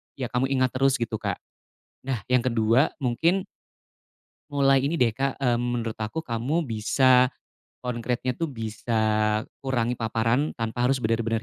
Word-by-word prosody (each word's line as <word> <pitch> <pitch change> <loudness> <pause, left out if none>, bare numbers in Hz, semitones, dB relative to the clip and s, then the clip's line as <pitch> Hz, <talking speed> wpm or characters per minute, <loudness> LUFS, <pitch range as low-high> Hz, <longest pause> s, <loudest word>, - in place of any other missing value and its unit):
iya 130 -3 -3
kamu 125 +1 +1
ingat 130 -2 +1
terus 135 0 +2
gitu, 115 -4 -3
Kak. - - -2 0.7
Nah, 125 -7 -3
yang 125 -1 +3
ke-2 115 +2 +3
mungkin 165 +8 +1 1.0
mulai 135 -1 +3
ini 145 +5 0
deh 120 -6 +3
Kak, 135 +3 -1
mmm, 120 -3 +1
menurut 120 -2 -2
aku 110 +10 -3
kamu 125 +9 -1
bisa 125 +2 +3 0.5
konkretnya 125 +1 -2
tuh 165 +5 -2
bisa 115 -3 -5 0.6
kurangi 125 -2 -1
paparan 115 +5 0
tanpa 115 +1 -1
harus 130 -1 +1
benar-benar 115 0 0
125 Hz, 140 wpm, -25 LUFS, 115-135 Hz, 1.0 s, yang